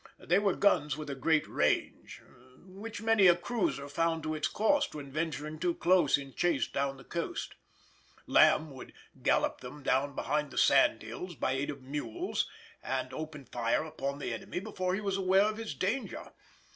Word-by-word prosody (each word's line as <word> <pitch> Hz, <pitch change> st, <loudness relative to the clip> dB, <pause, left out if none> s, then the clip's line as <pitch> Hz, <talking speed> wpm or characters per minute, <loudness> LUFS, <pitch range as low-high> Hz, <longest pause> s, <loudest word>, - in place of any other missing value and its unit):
They 180 Hz, +4 st, +2 dB
were 200 Hz, -2 st, +1 dB
guns 150 Hz, -8 st, +2 dB
with 150 Hz, -2 st, -5 dB
a -, -, -2 dB
great 155 Hz, +3 st, +2 dB
range, -, -, -1 dB, 0.4 s
which 205 Hz, +4 st, -8 dB
many 225 Hz, -4 st, +5 dB
a 175 Hz, -, +7 dB
cruiser 175 Hz, -7 st, -2 dB
found 165 Hz, +2 st, 0 dB
to 155 Hz, 0 st, -2 dB
its 155 Hz, -1 st, 0 dB
cost 250 Hz, -, +1 dB
when 140 Hz, -2 st, -7 dB
venturing 155 Hz, 0 st, -3 dB
too 175 Hz, 0 st, 0 dB
close 175 Hz, -5 st, +4 dB
in 135 Hz, -2 st, -9 dB
chase 170 Hz, -6 st, +1 dB
down 140 Hz, 0 st, -2 dB
the -, -, -13 dB
coast. 170 Hz, -1 st, -4 dB, 0.7 s
Lamb 155 Hz, -1 st, +4 dB
would 130 Hz, -, -11 dB, 0.3 s
gallop -, -, +1 dB
them 130 Hz, +3 st, -9 dB
down 135 Hz, +2 st, +1 dB
behind 150 Hz, -1 st, -1 dB
the -, -, -11 dB
sandhills, 135 Hz, +5 st, +2 dB
by 130 Hz, -, -1 dB
aid 135 Hz, +2 st, -1 dB
of 140 Hz, -3 st, -6 dB
mules, 150 Hz, -, -3 dB, 0.3 s
and -, -, -3 dB
open 155 Hz, -3 st, -6 dB
fire 120 Hz, +3 st, 0 dB
upon 140 Hz, -3 st, -4 dB
the 145 Hz, -, -3 dB
enemy 190 Hz, -1 st, -5 dB
before 185 Hz, -2 st, -2 dB
he 205 Hz, -, -3 dB
was 195 Hz, -2 st, -1 dB
aware 190 Hz, +1 st, +4 dB
of 215 Hz, 0 st, -1 dB
his 225 Hz, -1 st, -5 dB
danger. 225 Hz, +8 st, -3 dB
155 Hz, 175 wpm, -31 LUFS, 140-190 Hz, 0.7 s, a